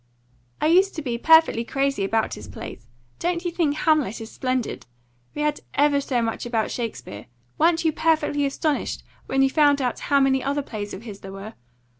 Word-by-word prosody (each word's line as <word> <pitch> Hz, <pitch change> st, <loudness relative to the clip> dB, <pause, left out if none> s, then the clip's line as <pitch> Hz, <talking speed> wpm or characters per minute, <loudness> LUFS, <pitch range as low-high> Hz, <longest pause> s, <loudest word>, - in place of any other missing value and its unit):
"I -, -, 0 dB
used 370 Hz, +5 st, +4 dB
to 315 Hz, -, -4 dB
be 240 Hz, -3 st, -3 dB
perfectly 320 Hz, -6 st, +5 dB
crazy 275 Hz, -3 st, -1 dB
about 220 Hz, +3 st, 0 dB
his 105 Hz, -, -8 dB
plays. 105 Hz, +3 st, -9 dB, 0.3 s
Don't 350 Hz, 0 st, -1 dB
you 350 Hz, -, 0 dB
think 325 Hz, -4 st, 0 dB
'Hamlet' 310 Hz, -, +1 dB
is 225 Hz, 0 st, -8 dB
splendid? 255 Hz, -2 st, -3 dB, 0.5 s
We 300 Hz, -, -1 dB
had 300 Hz, 0 st, 0 dB, 0.2 s
ever 285 Hz, 0 st, +3 dB
so 250 Hz, -4 st, 0 dB
much 225 Hz, 0 st, -3 dB
about 230 Hz, -3 st, -1 dB
Shakespeare. 220 Hz, -, -6 dB, 0.3 s
Weren't 330 Hz, +1 st, +3 dB
you 320 Hz, -, +4 dB
perfectly 305 Hz, -3 st, +1 dB
astonished 290 Hz, +2 st, -2 dB, 0.2 s
when 270 Hz, 0 st, +2 dB
you 270 Hz, -, +2 dB
found 290 Hz, -2 st, +4 dB
out 250 Hz, -3 st, -1 dB
how 280 Hz, -1 st, +5 dB
many 265 Hz, -1 st, +2 dB
other 285 Hz, +1 st, -1 dB
plays 205 Hz, -5 st, -6 dB
of 195 Hz, -, -10 dB
his 210 Hz, -4 st, -9 dB
there 195 Hz, -, -9 dB
were? 195 Hz, +3 st, -8 dB
275 Hz, 190 wpm, -24 LUFS, 230-310 Hz, 0.5 s, perfectly